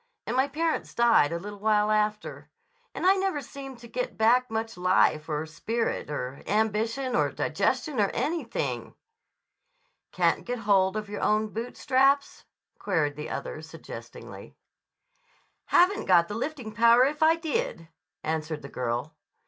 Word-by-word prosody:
And 235 - -2
my 265 +2 +3
parents 320 +3 -2
died 235 -11 +4
a 170 - -1
little 205 +3 -8
while 210 0 +2
after. 210 0 -1 0.5
And - - -3
I 380 - +7
never 380 -5 0
seemed 270 -1 -9
to 235 - -11
get 250 +2 -4
back 245 +3 +3
much 225 -1 -3
life 180 -3 +2
or 150 0 -2
spirit 225 +9 -3
or 135 -2 -5
ambition 220 +5 0
or - - +2
digestion 295 -7 -1
or 200 -2 +3
anything." 335 +1 -3 1.2
"Can't - - +1
get 245 0 -3
hold 195 0 +3
of 215 -1 -4
your 205 0 -6
own 215 0 +2
boot 230 +3 -6
straps?" 275 +2 +2 0.3
queried 160 -7 0
the 150 +1 -6
other - - -5
suggestingly. - - -10 1.1
"Haven't 375 +4 +3
got 170 -2 +5
the - - -6
lifting 245 -1 -4
power 235 +3 +5
if 295 +2 -2
I 320 +1 +6
did," 330 - -3 0.4
answered 155 -1 -3
the 140 - -8
girl. 125 +5 -3
220 Hz, 150 wpm, -27 LUFS, 185-270 Hz, 1.2 s, I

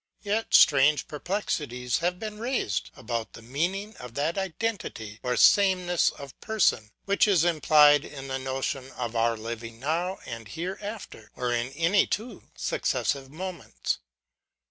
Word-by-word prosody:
Yet 215 +2 0
strange 145 0 +6
perplexities 145 - -2
have 175 +2 0
been 210 +1 -6
raised 235 - -1
about 115 -1 -4
the 115 - -11
meaning 180 - -2
of 125 -1 -10
that 150 +4 0
identity 190 - -3
or 125 -1 -1
sameness 185 -3 +4
of 140 -2 -10
person, 200 - +1 0.2
which 200 +2 +3
is 185 -6 +4
implied 150 -3 +5
in 135 -2 -8
the 135 0 -2
notion 130 0 -3
of 120 -2 -4
our 115 0 +2
living 115 +1 -7
now 170 +7 -1
and 115 -3 -7
hereafter, 190 - -6
or 125 -1 -1
in 120 0 0
any 170 +7 +3
two 225 +4 -4
successive 135 -2 -1
moments. 170 - -4
150 Hz, 140 wpm, -27 LUFS, 125-190 Hz, 0.2 s, strange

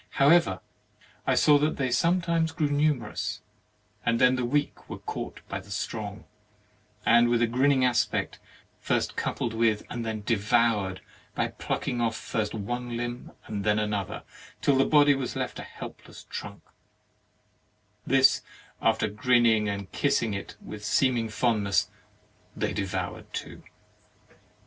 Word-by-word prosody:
However, 140 - +4 0.7
I - - +3
saw 145 -1 +5
that 150 +2 0
they 130 -3 -1
sometimes 170 +3 +2
grew 155 -3 -1
numerous, 145 -6 -1 0.6
and 115 0 +1
then 125 0 +5
the 130 - -1
weak 145 +4 -1
were - - -5
caught - - -6
by 100 - -4
the 95 +2 -15
strong, 105 0 -4 0.8
and 120 0 +5
with 120 -1 +3
a 120 - +4
grinning 130 +3 +3
aspect, 125 - 0 0.4
first - - -1
coupled 115 - -2
with 110 -2 +2
and 120 - -3
then 110 -1 -3
devoured 105 -3 +1 0.3
by - - 0
plucking 120 - -3
off 115 -1 +1
first 110 -2 -3
one 120 +4 -4
Umb 120 +1 -5
and 105 -2 -4
then 105 +1 +2
another 105 -3 -2 0.4
till 140 - +3
the 135 - +4
body 145 -1 +5
was 135 -3 -3
left - - -3
a - - -5
help - - -10
less - - -13
trunk; - - -7 1.4
this, 135 +2 +4 0.4
after - - +2
grinning 110 0 +3
and 100 -1 -5
kissing 140 -7 +1
it 100 - -6
with 105 -1 -9
seeming 120 0 +2
fondness, 105 -4 +1 0.6
they - - -1
devoured 95 -2 -4
too. - - -6
120 Hz, 140 wpm, -27 LUFS, 105-135 Hz, 1.4 s, saw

